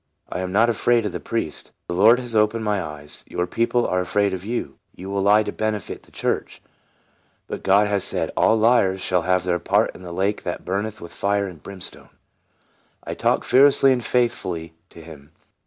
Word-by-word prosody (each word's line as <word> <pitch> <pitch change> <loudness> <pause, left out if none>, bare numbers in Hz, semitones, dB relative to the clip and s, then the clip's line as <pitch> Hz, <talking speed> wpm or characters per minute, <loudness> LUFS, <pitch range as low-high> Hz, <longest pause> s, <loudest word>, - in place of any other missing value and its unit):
I - - -4
am 95 0 -3
not 110 +5 +4
afraid 120 0 +2
of 105 - -2
the - - -5
priest. 115 -10 -4 0.2
The 90 - -3
Lord 110 +7 +6
has 120 -2 -6
open 105 +1 +2
ed - - -5
my 105 -2 0
eyes. 75 -2 -8
Your 90 - -2
people 120 +4 0
are 90 - 0
afraid 100 +2 +1
of 95 -1 -5
you. 120 +4 -4 0.2
You 95 +2 -8
will 100 0 0
lie 105 +2 +5
to - - -4
benefit 110 -3 -3
the - - -23
church; - - -3 0.9
but - - -6
God 100 +2 +4
has 100 -2 0
said, - - -1
' - - -32
All 110 - +4
liars 110 -4 +3
shall 90 -1 0
have 90 +1 +1
their 90 -1 0
part - - +1
in - - -13
the 90 -2 -8
lake 95 +4 -1
that 90 - -5
burneth 105 +3 -3
with 85 - -9
fire 100 0 0
and 90 -6 -9
brimstone.'" 95 +1 -8 0.9
I - - -5
talked - - 0
fearlessly 135 +1 +5
and 125 -2 -2
faithfully 95 -10 -1 0.2
to 85 - -13
him. 75 -2 -13
100 Hz, 205 wpm, -22 LUFS, 90-110 Hz, 0.9 s, Lord